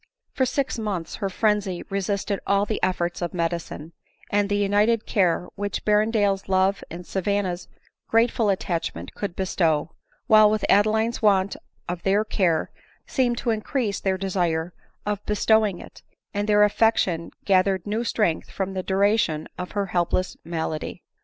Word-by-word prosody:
For 260 - +1
six 270 -2 -1
months 195 -7 -3
her 195 - -2
frenzy 205 -2 0
resisted 200 +1 -1
all 200 0 +3
the 215 - -3
efforts 175 -1 -1
of 175 +1 -3
medicine, 170 -2 -3 0.4
and 205 0 +2
the 205 - +1
united 205 +3 +2
care 180 -3 +1
which 205 0 -4
Ber 210 0 +4
rendale's 205 -3 0
love 190 +1 +2
and 175 +2 -8
Savanna's 190 -1 -1 0.4
grateful 230 -1 +2
attachment 165 - -2
could 200 -4 -5
bestow; 165 -4 0 0.3
while 215 -1 +7
with 215 -1 0
Adeline's 220 +3 +3
want 200 -2 +3 0.3
of 175 0 -4
their 200 +3 +2
care 180 -7 +1 0.3
seemed 245 -3 0
to 235 - 0
increase 220 -1 -1
their 190 -1 0
desire 175 -3 -1 0.3
of 205 -1 -2
bestowing 210 -2 +3
it, - - -12 0.3
and 205 +1 -2
their 210 0 +6
affection 205 -5 +2 0.2
gathered 190 -1 +2
new 215 +3 -1
strength 210 -8 0
from 190 0 -3
the 190 - -2
duration 190 -5 +1
of 180 - -5
her 200 -1 0
helpless 180 0 0
malady. 160 -2 -4
195 Hz, 150 wpm, -24 LUFS, 180-210 Hz, 0.4 s, while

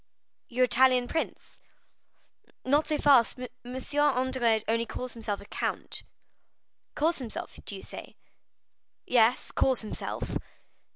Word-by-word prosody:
"Your 255 +1 +3
Italian 255 -1 +4
prince?" 320 - -4 1.1
"Not 290 +4 +3
so 305 - +1
fast; 270 -5 +5
M. 250 - -4 0.5
Andrea 255 -5 +2
only 230 +1 +1
calls 250 -1 -5
himself 215 -4 -4
count." - - -3 0.9
"Calls 325 +2 +1
himself, 235 -5 -6
do 200 - -4
you 190 - -9
say?" - - -9 0.9
"Yes, 240 0 +3
calls 260 -3 +2
himself." 215 - -4
250 Hz, 110 wpm, -29 LUFS, 230-265 Hz, 1.1 s, fast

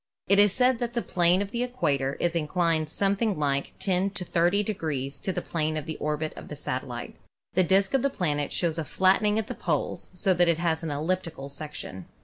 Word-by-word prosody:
It 200 +1 +5
is 205 -1 +6
stated 250 +2 +3
that 240 0 -3
the 235 - 0
plane 175 +2 +3
of 200 - -8
the 235 - -2
equator 140 - 0
is 175 -1 0
inclined 165 -1 +1
something 200 +3 +1
like 140 -2 -1
10 190 0 +1
to 190 -2 -5
30 175 +5 +2
degrees 150 -9 -3
to 190 - -2
the - - -3
plane 155 -1 -1
of 150 - -4
the 160 - -5
orbit 150 +1 -2
of - - -9
the - - -6
satellite. - - -4 0.4
The 185 - +4
disk 195 +4 +3
of 270 - +3
the 280 - +2
planet 150 - -1
shows 165 -2 0
a - - -1
flat 190 +5 +3
tening 210 0 +2
at 220 - 0
the - - -5
poles, - - -2
so 190 +1 +2
that 175 0 +3
it 170 -2 +3
has 165 -1 0
an 165 - -3
elliptical 155 -1 -2
section. 140 - -6
175 Hz, 220 wpm, -27 LUFS, 155-200 Hz, 0.4 s, is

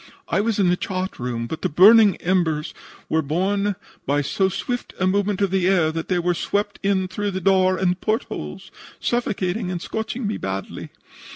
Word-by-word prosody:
I - - +2
was 220 0 0
in 195 -3 +3
the 180 - +3
chart 185 +1 -4
room, 120 -2 -3
but 155 +7 -6
the 185 - 0
burning 205 +5 +7
embers 165 -4 0 0.3
were 160 - +1
borne 195 +7 0 0.3
by 145 +2 +2
so 190 +7 +1
swift 245 +6 -4
a 185 - +2
movement 200 +1 +1
of 200 -2 +1
the 190 -2 +2
air 175 -5 +3
that 165 +1 -4
they 185 - +1
were 175 0 +1
swept 205 +4 -2
in 195 -1 +1
through 205 +2 -3
the 190 -1 -3
door 185 0 +3
and 180 -1 0
port 220 +1 0
holes, 75 0 -8 0.3
suffocating 205 -4 -1
and 180 -1 -3
scorching 220 +6 -4
me 205 - -1
badly. 95 0 -5
185 Hz, 190 wpm, -22 LUFS, 170-205 Hz, 0.3 s, burning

